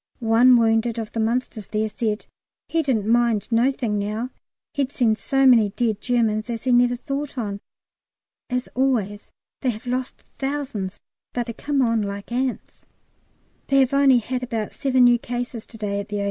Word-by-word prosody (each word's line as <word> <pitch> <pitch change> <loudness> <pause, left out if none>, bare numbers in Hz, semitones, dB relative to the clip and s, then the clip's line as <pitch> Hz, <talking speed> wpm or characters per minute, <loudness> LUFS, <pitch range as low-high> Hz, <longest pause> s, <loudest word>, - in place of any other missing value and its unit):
One 240 +2 +5
wounded 225 0 +2
of 220 -2 -4
the 230 - -4
Munsters 225 -2 -1
there 215 0 -1
said 215 0 -2 0.4
he 330 - +1
didn't 250 -9 0
mind 230 -3 +2
nothink 230 -2 +1
now, 215 +5 -3 0.4
he'd 280 -2 -1
seen 235 -6 +2
so 270 +4 +1
many 230 -5 +6
dead 220 0 -1
Germans 225 -3 0
as 230 -2 -4
he 255 - +1
never 245 0 +4
thought 275 +3 -5
on. 205 -4 -3 0.9
As 250 0 -2
always, 230 -6 -1 0.3
they 260 - +1
have 220 0 -5
lost 250 +1 -3 0.2
thousands, 270 -9 -3 0.3
but 240 -1 -1
they 230 - -5
come 280 +2 0
on 230 -2 +2
like 200 +1 -5
ants. 255 +1 -3 0.8
They 275 - +4
have 260 0 +1
only 275 -2 +5
had 250 +2 -2
about 225 -4 -3
seven 260 -2 +2
new 240 -1 +6
cases 240 -1 -5
to 225 - -12
day 200 -2 -2
at 200 - -5
the 210 - -3
O. - - -2
240 Hz, 175 wpm, -23 LUFS, 215-255 Hz, 0.9 s, many